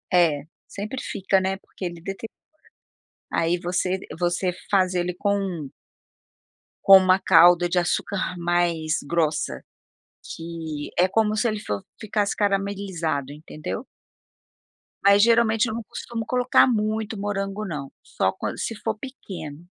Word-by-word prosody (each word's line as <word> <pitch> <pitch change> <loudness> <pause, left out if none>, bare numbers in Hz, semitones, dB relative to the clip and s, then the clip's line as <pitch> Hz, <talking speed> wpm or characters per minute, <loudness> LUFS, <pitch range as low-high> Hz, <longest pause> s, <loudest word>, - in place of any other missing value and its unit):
É, 160 -5 +4 0.2
sempre 215 +6 -5
fica, 195 -1 +1
né, 190 +1 -1
porque 195 - -9
ele 170 -1 -5
deteriora. 195 +5 -6 1.0
Aí, 165 +1 +1
você 180 +2 -1 0.2
você 175 +1 +1 0.2
faz 185 -2 +3
ele 180 0 0
com 190 -6 -1 1.1
com 195 0 +10
uma 185 0 +4
calda 175 -1 +6
de 180 - 0
açúcar 185 +2 0
mais 170 -2 +1
grossa, 160 -1 0 0.7
que 165 -3 -6
é 180 - +5
como 215 +2 +1
se 215 +2 +1
ele 215 -1 -3
for 105 - -3 0.2
ficasse 210 -1 0
caramelizado, 195 -8 -1
entendeu? 155 - -6 1.2
Mas, 200 0 +6
geralmente, 230 -1 +4
eu 220 - -3
não 230 - -3
costumo 230 +2 -6
colocar 250 0 +4
muito 220 -2 -1
morango 200 +1 -3
não, 145 -6 -5
só - - 0
quando - - -5
se 225 - -3
for 220 +1 -3
pequeno. 180 - -8
190 Hz, 130 wpm, -24 LUFS, 170-210 Hz, 1.2 s, com